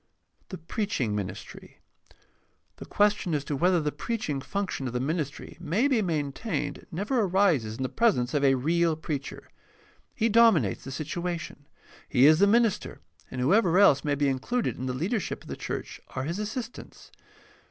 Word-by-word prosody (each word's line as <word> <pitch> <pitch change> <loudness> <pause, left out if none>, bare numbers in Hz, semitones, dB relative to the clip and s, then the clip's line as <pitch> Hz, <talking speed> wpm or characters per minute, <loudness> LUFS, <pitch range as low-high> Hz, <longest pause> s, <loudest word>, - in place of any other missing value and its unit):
The 185 - -6
preaching 165 - -2
ministry. 100 -3 -7 0.5
— - - -42
The - - -10
question 205 -5 +1
as 145 - -1
to 145 - -2
whether 175 +4 +3
the 150 -2 -1
preaching 205 - -3
function 190 -6 -3
of 120 - -5
the 125 - -1
ministry 150 +1 -3
may 210 - +1
be 260 -6 +2
maintained 160 - -3
never 205 +9 -1
arises 175 - +2
in 130 - -3
the - - 0
presence 170 - +1
of 145 -1 +1
a 135 -1 +5
real 165 +5 +1
preacher. 150 -3 -5 0.7
He 225 - +1
dominates 215 - +4
the 135 - -8
situation. 165 +1 -5 0.4
He 130 0 +5
is 155 +2 +6
the 200 - +5
minister, 230 0 +1 0.3
and 130 - -6
whoever 180 - +3
else 145 -9 +5
may 145 -1 0
be 145 0 +1
in 135 -1 0
cluded 245 - -1
in 130 - -5
the 125 - -2
leadership 185 - -2
of - - -14
the - - -4
church - - -6
are 130 - -2
his 170 +7 -3
assistants. 225 +2 -7
165 Hz, 175 wpm, -27 LUFS, 135-205 Hz, 0.7 s, is